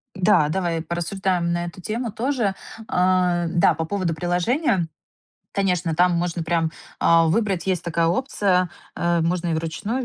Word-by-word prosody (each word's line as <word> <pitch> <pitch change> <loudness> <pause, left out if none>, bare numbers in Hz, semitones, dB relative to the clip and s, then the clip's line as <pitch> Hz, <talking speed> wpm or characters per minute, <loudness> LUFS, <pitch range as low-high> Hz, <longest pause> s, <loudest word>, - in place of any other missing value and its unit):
Да, 185 -5 +3
давай, 170 -1 -1
э, - - -4
порассуждаем 175 +1 -1
на 175 0 -1
эту 175 +1 -9
тему 225 +4 -3
тоже. 235 -2 0 0.3
А, 180 -1 +2
да, 170 0 +3
по 160 +1 -3
поводу 185 -1 -1
приложения, 175 - 0 0.7
конечно, 180 -4 0
там 180 +2 +4
можно 170 0 -1
прям, 165 -1 +1 0.3
а, 165 0 +5
выбрать, 195 +1 0
есть 185 -3 0
такая 170 -1 0
опция, 185 - +1 0.2
э, 170 0 +1
можно 170 +1 0
и 165 - 0
вручную 165 +11 -3
175 Hz, 155 wpm, -23 LUFS, 170-195 Hz, 0.7 s, а